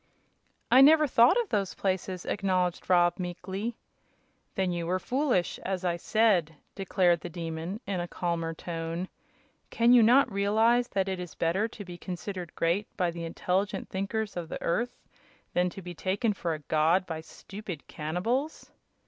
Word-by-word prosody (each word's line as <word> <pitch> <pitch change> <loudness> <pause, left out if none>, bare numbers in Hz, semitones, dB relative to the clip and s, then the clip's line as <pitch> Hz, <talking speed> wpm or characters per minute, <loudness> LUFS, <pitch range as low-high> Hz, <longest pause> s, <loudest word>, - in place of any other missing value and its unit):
"I 260 - +8
never 305 +2 +7
thought 250 - +5
of 465 -5 -2
those 200 -3 -1
places," 185 -1 -2
acknowledged 185 -4 -1
Rob, 175 -1 +4
meekly. 190 +5 -4 0.8
"Then 190 -2 0
you 170 -1 -3
were 185 +2 +1
foolish, 250 -3 0
as 185 -1 -3
I 175 -1 +1
said," 180 -5 +2 0.2
declared 185 -3 +2
the 175 - -6
Demon, 165 +4 -5
in 195 -2 -2
a 175 - -3
calmer 170 -2 -2
tone. 165 +2 -4 0.6
"Can 235 +1 +4
you 245 - +8
not 245 +3 +5
realize 220 +5 +3
that 195 -4 -1
it 190 -1 -2
is 180 -2 -7
better 185 +6 +1
to 220 -3 -10
be 175 -1 -9
considered 180 -1 -6
great 175 +5 0
by 180 -3 +1
the 170 0 -6
intelligent 185 +4 -2
thinkers 205 +2 -3
of 170 -2 -5
the - - -5
earth, 235 +9 -1 0.6
than 180 0 +2
to 190 +2 -10
be 175 0 -7
taken 200 +6 0
for 170 -4 -2
a - - -8
god 160 +4 +3
by 160 -2 -5
stupid 190 0 -9
cannibals?" 225 - -3
185 Hz, 165 wpm, -28 LUFS, 175-215 Hz, 0.8 s, I